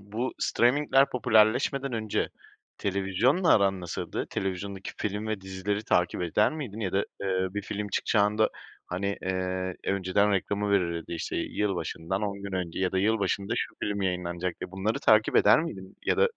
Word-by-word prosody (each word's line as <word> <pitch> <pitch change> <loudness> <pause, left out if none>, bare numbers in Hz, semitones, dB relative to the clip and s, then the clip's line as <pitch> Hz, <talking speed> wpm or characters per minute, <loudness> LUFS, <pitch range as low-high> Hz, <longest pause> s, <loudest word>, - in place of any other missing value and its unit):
bu 110 +6 -3
streaming'ler 135 +2 +3
popülerleşmeden 125 +4 +3
önce 110 -2 -1 0.5
televizyonla 100 - +2
aran 95 -2 +2
nasıldı? 90 - -4
Televizyondaki 95 +1 -3
film 105 +1 -3
ve 110 -2 -2
dizileri 95 +2 -3
takip 90 -1 +1
eder 90 +5 +2
miydin? 125 -9 -6
Ya 95 -4 -2
da, 95 - +2 0.2
eee, 95 -1 0
bir 105 - -2
film 105 +1 -4
çıkacağında, 105 +2 +2 0.4
hani, 100 +3 -2
eee, 95 0 -2
önceden 100 +2 +2
reklamı 100 +1 0
verilirdi, 85 -4 0
işte, 85 - -3
"yılbaşından 95 -1 -2
10 100 -1 -3
gün 100 - -6
önce 90 -2 -3
ya 95 -1 +1
da 95 - +1
yılbaşında 100 0 +1
şu - - -2
film 100 -1 -1
yayınlanacak" 90 -1 -2
diye, - - -5
bunları 95 +4 -1
takip 110 0 +4
eder - - +6
miydin? 95 - -7
Ya - - +3
da 475 - +4
100 Hz, 160 wpm, -28 LUFS, 95-110 Hz, 0.5 s, eder